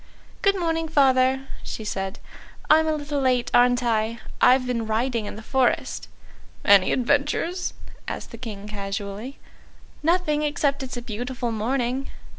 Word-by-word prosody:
"Good 395 -1 +3
morning, 325 -1 0
Father," 265 -3 +3
she 220 - -6
said; 195 -2 -3 0.5
"I'm 315 +1 +6
a 315 - +2
little 290 -1 -2
late, 255 -2 +1
aren't 245 0 +4
I? 225 -1 0 0.2
I've 255 +1 +6
been 235 -3 -2
riding 225 0 0
in - - -6
the 220 - -9
forest." 260 0 0 0.6
"Any 200 -2 +6
adventures?" 290 +7 0 0.3
asked - - -5
the 230 - -9
King 210 -4 -7
casually. 200 +4 -5 0.6
"Nothing, 315 -2 +2
except 290 -2 0
it's 255 -2 -5
a 240 - -5
beautiful 240 +1 -3
morning." 245 +4 -1
250 Hz, 140 wpm, -24 LUFS, 225-285 Hz, 0.6 s, I'm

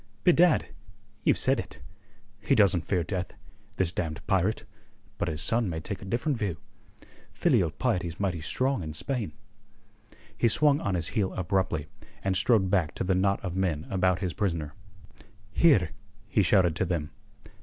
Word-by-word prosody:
"Bedad! 175 -1 +4 0.5
ye've - - +3
said - - +2
it. - - -7 0.6
He 105 - +1
doesn't 95 -6 +3
fear 90 -3 +1
death, 90 0 -4 0.4
this 90 -3 +1
damned 80 -3 -4
pirate; 100 +3 0 0.5
but - - 0
his 75 0 -1
son 115 -3 +2
may 80 -2 -3
take 95 +4 -6
a - - -8
different 120 +6 -1
view. 100 -8 -2 0.8
Filial 85 - +2
piety's 90 - -2
mighty 90 -5 -1
strong 130 - 0
in 80 -2 -6
Spain." 125 - -3 1.0
He 115 - +2
swung 145 +5 +3
on 100 -1 -1
his 85 -2 -2
heel 100 -3 -1
abruptly, 90 -4 -1 0.4
and 95 -1 0
strode 95 -2 +2
back 90 -6 +1
to - - -2
the 95 +1 +1
knot 100 +2 +1
of 90 -1 -4
men 85 -5 -1
about 95 -2 +2
his 90 -4 -2
prisoner. 80 -6 -2 0.8
"Here!" 100 - +4 0.4
he - - +2
shouted 90 -5 +3
to 95 - +1
them. 80 -4 -2
95 Hz, 160 wpm, -28 LUFS, 85-105 Hz, 1.0 s, Bedad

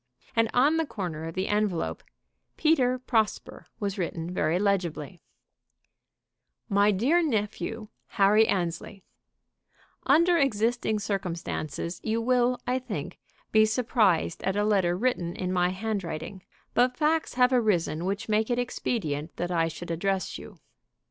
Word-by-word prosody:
And 225 -1 +3
on 285 +6 +3
the 325 - +1
corner 165 - -5
of 165 - -7
the 185 +1 -1
envelope 205 -5 -1 0.5
"Peter 265 -6 +3
Prosper" 225 -4 -1
was 200 -1 -3
written 170 -1 -3
very 160 -1 +1
legibly: 180 -4 -1 1.5
"MY 200 0 +4
DEAR 250 - +3
NEPHEW, 220 -4 -2 0.2
HENRY 210 +2 +4
ANNESLEY, 180 +2 -2 1.0
"Under 340 +2 +5
existing 230 -3 +1
circumstances 175 -5 -4
you 225 +1 0
will, 250 +1 +2
I 255 +1 0
think, 185 - -6 0.3
be 215 0 +6
surprised 215 -7 +1
at 190 +1 -1
a 205 - +1
letter 190 -4 +2
written 185 -7 -1
in 185 0 -3
my 180 -1 +2
handwriting; 190 -3 -4 0.3
but 250 +1 +2
facts 310 -1 +1
have 250 +1 +4
arisen 175 -9 +1
which 195 +1 -2
make 215 +1 +1
it 240 - +1
expedient 165 - -2
that 175 +1 -2
I 165 -2 +2
should 170 +1 -7
address 190 +3 -1
you. - - -12
205 Hz, 135 wpm, -27 LUFS, 175-240 Hz, 1.5 s, be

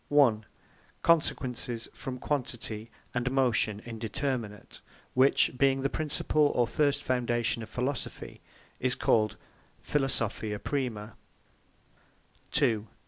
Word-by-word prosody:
a. 140 -7 +5 0.7
Consequences 125 -7 +1
from 130 -1 -5
Quantity, 120 -5 -3 0.2
and 120 0 0
Motion 120 -6 +2
Indeterminate; 115 -1 -3 0.3
which, 130 +2 +4
being 135 +1 +3
the 140 - +1
Principles 150 -1 +1
or 120 - +4
first 145 +4 +1
foundation 120 -2 0
of 110 - -7
Philosophy, 130 +1 -4 0.4
is 125 0 +1
called 110 -2 +2 0.4
Philosophia 115 -6 -1
Prima 115 -5 -3 1.3
PHILOSOPHIA 150 -2 +4
PRIMA 110 0 -4
b. - - -30
125 Hz, 105 wpm, -29 LUFS, 115-140 Hz, 1.3 s, a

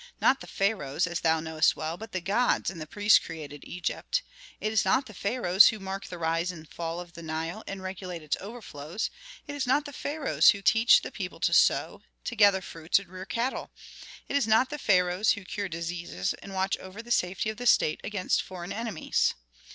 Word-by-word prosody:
Not 270 - +4
the - - -9
pharaohs, 190 -7 0
as 175 -1 -3
thou 160 -1 +2
knowest 160 0 +2
well, 155 +2 -3
but 220 +4 -10
the 185 - -3
gods 210 +6 +1
and 170 -4 -9
the 155 - -6
priests 205 +5 +5
created 145 -3 -8
Egypt. - - -2 0.4
It 215 +1 -2
is 220 - +3
not 225 +8 +2
the 215 - -11
pharaohs 200 -1 +5
who 220 - +1
mark 195 -1 -6
the 175 - -7
rise 165 +2 0
and 160 -3 -11
fall 165 +1 -5
of 175 -1 -9
the 170 - -9
Nile 165 +5 -4
and 195 -1 -6
regulate 185 -3 -6
its 150 - 0
overflows; 200 -4 -5 0.3
it 290 - -6
is 285 -3 -2
not 285 +4 +3
the 285 - -8
pharaohs 290 +2 +2
who 200 - -12
teach 225 +4 +5
the - - -6
people - - -6
to - - +2
sow, - - +3 0.2
to 240 - -4
gather 200 -3 +5
fruits 165 -2 0
and 195 -2 -5
rear 185 +1 -8
cattle. 240 +5 -2 0.6
It - - -3
is 280 -5 +2
not 225 +5 +4
the 295 - -4
pharaohs 180 -1 +3
who 205 -3 -8
cure 200 +1 -4
diseases 170 - -3
and 195 -1 -9
watch 190 +1 0
over 190 +4 -9
the 240 - -10
safety 195 +1 +1
of 215 - -11
the 245 - -2
state 155 -8 +4
against 200 -3 0
foreign 180 -1 -7
enemies. 225 -6 0
190 Hz, 210 wpm, -28 LUFS, 170-220 Hz, 0.6 s, priests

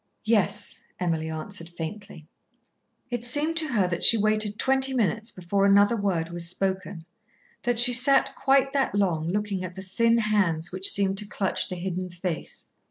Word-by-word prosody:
"Yes," 210 -2 +1 0.2
Emily 165 -3 -2
answered 165 +2 -4
faintly. 170 0 -8 0.9
It 240 -1 -3
seemed 290 +7 +1
to 320 -2 +2
her 200 -5 +2
that 170 -1 -3
she 230 - +9
waited 215 0 0
twenty 265 +1 +1
minutes 220 0 0
before 185 +2 -2
another 200 +3 +4
word 185 -6 -2
was 170 0 -2
spoken, 190 -2 -3 0.6
that 240 -1 -1
she 245 +1 +6
sat 265 +3 +3
quite 275 0 +1
that 270 -6 0
long 170 -6 0
looking 200 0 -2
at 180 0 -7
the 190 - -8
thin 230 +5 +1
hands 195 -7 0
which 185 +1 0
seemed 195 -1 +1
to 210 - -6
clutch 195 -2 -2
the 185 - -5
hidden 180 0 -4
face. 175 -1 -6
200 Hz, 165 wpm, -25 LUFS, 180-230 Hz, 0.9 s, she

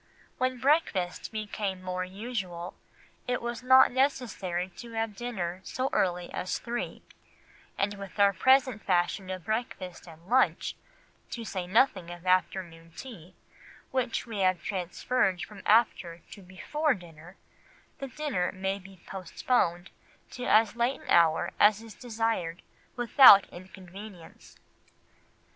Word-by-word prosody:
When 255 0 0
breakfast 250 - 0
became 205 -3 -4
more 185 0 -3
usual, 185 -3 -5 0.5
it 250 0 0
was 235 -1 -5
not 260 +1 +6
necessary 235 -9 -1
to 235 -1 -10
have 225 -2 -2
dinner 190 -6 -4
so 260 +1 -3
early 180 -1 0
as 185 - -2
three; 240 0 -5 0.7
and 200 +1 0
with 200 0 -10
our 200 0 +5
present 260 +2 +3
fashion 185 +1 0
of 185 -2 -5
breakfast 215 -6 -4
and 165 +1 -14
lunch, 255 +4 +2 0.5
to 230 -2 -6
say 185 -4 -4
nothing 195 -4 +2
of 175 0 -10
afternoon 175 -3 -1
tea, 185 -9 -10 0.6
which 255 -3 -1
we 225 -4 -6
have 185 -3 +2
transferred 185 0 -1
from 200 +3 -10
after 185 -6 +2
to 200 - -11
before 260 - -1
dinner, 175 -1 -14 0.6
the 275 - -5
dinner 260 -9 -2
may 190 +1 -3
be 190 -1 -15
postponed 185 -1 -1 0.4
to 250 -1 -6
as 220 0 +4
late 240 +3 0
an - - -14
hour 165 -2 +4
as 210 0 +5
is 225 -2 -11
desired 225 -8 -3 0.3
without 240 -4 +8
inconvenience. 185 0 -12
195 Hz, 130 wpm, -28 LUFS, 180-240 Hz, 0.7 s, without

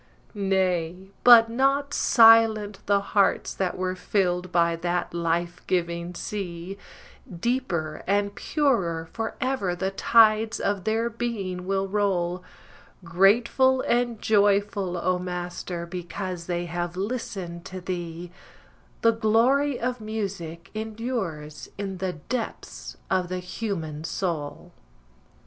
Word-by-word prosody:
Nay, 190 -2 -1
but 235 -2 +9
not 275 +4 +1
silent 225 -4 +5
the 200 0 +4
hearts 200 -1 +2
that 185 -2 -2
were 185 0 -2
filled 180 -2 -1
by 170 -1 +3
that 175 +1 -2
life 170 +1 -1
giving 170 -1 -1
sea; 180 -2 -5 0.6
Deeper 170 -6 -2
and 200 +1 +1
purer 195 - 0
forever 225 -4 -2
the 190 +2 -2
tides 220 +1 +4
of 200 -2 -1
their 225 +2 +1
being 210 -6 -4
will 195 0 0
roll, 185 -3 0 0.6
Grateful 235 +9 +3
and 240 -2 0
joyful, 200 -3 +2
O 180 +1 0
Master, 180 -1 -5
because 180 0 -6
they 175 -1 -2
have 175 +1 -4
listened 190 -5 -4
to 185 - -7
thee, 175 -1 -5 0.7
The 230 - +5
glory 240 +5 +2
of 250 -1 -2
music 195 -6 -5
endures 215 -9 -4
in 195 -2 -4
the 185 -1 -2
depths 225 +9 -6
of 185 -2 +1
the 185 - -2
human 180 -5 -4
soul. 165 -4 -4
190 Hz, 115 wpm, -25 LUFS, 175-220 Hz, 0.7 s, but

